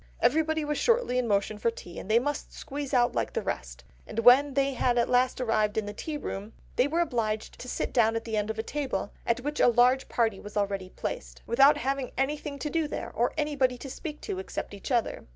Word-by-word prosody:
Everybody 315 +1 +2
was 295 0 -1
shortly 470 - +2
in 245 - -1
motion 205 0 0
for 230 - +2
tea, 175 -6 -9
and - - -9
they 220 - +5
must 285 +4 -1
squeeze 285 0 -6
out 245 -3 +3
like - - -1
the - - -1
rest... - - -5 0.2
and - - -9
when 255 +5 +6
they 275 -1 +1
at 240 -1 +2
last 250 +1 +2
arrived 215 -4 +1
in 220 - +1
the 205 - -5
tea 300 +8 -4
room... 210 -5 -6 0.2
they 250 - +3
were 330 +4 +1
obliged 225 -9 -2
to 255 - -7
sit - - -2
down 225 -3 +4
at 225 - -2
the 225 -1 -2
end 210 0 0
of 220 - -3
a 220 - -1
table, 260 -8 -3 0.2
at 235 +1 +1
which 295 +3 -3
a - - +6
large 245 +2 +4
party 225 -5 +1
were 205 - -8
already 195 -2 -1
placed, - - -6
without 275 +5 +5
having 270 0 -1
anything 285 +1 -1
to 300 - -3
do 325 -2 +1
there, - - -5
or 240 +1 +1
anybody 285 -4 +1
to 270 +2 -8
speak 300 +1 -6
to 185 - -4
except 190 - -5
each 200 - -7
other.... 240 -3 0
245 Hz, 230 wpm, -28 LUFS, 220-285 Hz, 0.2 s, when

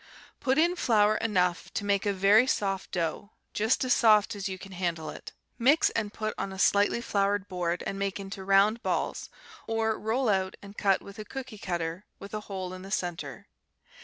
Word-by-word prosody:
Put 265 +1 +1
in 340 +3 +3
flour 215 -8 +3
enough 180 -5 0
to 205 - -2
make 200 0 +1
a - - +3
very 200 +5 +5
soft 195 -5 -1
dough, 170 +3 -2 0.2
just 220 +5 +1
as 250 - +4
soft 215 -1 +4
as 200 -1 -3
you 190 - -5
can 195 +1 -11
handle 170 -4 -3
it. - - -10 0.3
Mix, 275 +7 +4
and 215 -2 -2
put 215 0 -3
on 195 - -3
a 190 - -8
slightly 205 +4 +3
floured 200 -3 0
board 175 -2 -2
and 195 - -3
make 200 0 -2
into 195 0 -7
round 200 +4 +4
balls, - - -2 0.4
or 225 -1 0
roll 230 +4 0
out 190 -2 0
and 200 0 -12
cut 195 -2 +2
with 200 +1 -11
a - - -4
cooky 255 -3 -7
cutter 170 0 -3
with 200 - -11
a 215 - -2
hole 185 -2 -4
in 185 - -8
the 195 - -9
centre. 165 - -4
200 Hz, 195 wpm, -28 LUFS, 190-220 Hz, 0.4 s, very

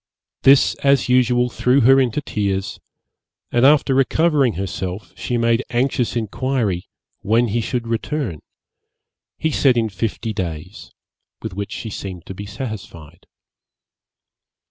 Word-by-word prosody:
This, 135 +1 +5
as 140 -2 +3
usual, 125 -1 +3
threw 125 +4 +2
her 135 +3 +6
into 130 +3 0
tears, 100 -6 -2 0.7
and 120 - +2
after 145 -2 +4
recovering 135 -1 +2
herself, 95 +1 -5
she 125 - -2
made 115 +1 +2
anxious 125 0 0
inquiry 115 -4 -2 0.3
when 115 +3 +2
he 115 +3 0
should 120 +1 -3
return; 115 - -2 1.0
he 160 - -1
said 135 -4 +3
in 115 -1 +1
fifty 110 +2 -3
days, 90 0 -6 0.5
with 110 -4 -5
which 100 +1 -5
she 110 - -6
seemed 95 -4 -7
to - - -7
be 100 +2 -8
satisfied. 100 - -8
115 Hz, 125 wpm, -20 LUFS, 100-130 Hz, 1.0 s, her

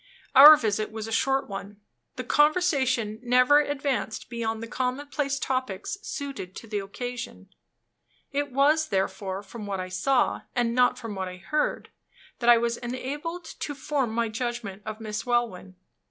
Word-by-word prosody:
Our 295 +3 +11
visit 215 -3 -1
was 220 -1 -5
a 225 - -7
short 270 +4 +1
one. 200 +1 -7 0.4
The 255 - -4
conversation 265 -7 +2
never 250 +4 +5
advanced 280 -6 -2
beyond 225 -1 -3
the - - -6
commonplace 275 +3 -2
topics 255 - -3
suited 275 - -6
to - - -8
the 210 -2 -3
occasion. 245 +5 -7 0.8
It 285 0 -2
was, 300 +4 +3
therefore, 195 0 -2
from 210 +1 -9
what 195 -1 -3
I 185 0 -4
saw, 245 +8 +1
and 240 -2 +1
not 250 0 +3
from 230 -4 -6
what 190 -1 -3
I 180 0 -8
heard, 300 - -2 0.5
that 240 -1 +2
I 240 - +9
was 235 0 0
enabled 290 +8 -5
to 295 -2 -6
form 270 -2 -1
my 230 +1 0
judgment 225 -3 -4
of 215 0 -5
Miss 215 -1 -4
Welwyn. 235 -7 -1
240 Hz, 155 wpm, -26 LUFS, 215-275 Hz, 0.8 s, Our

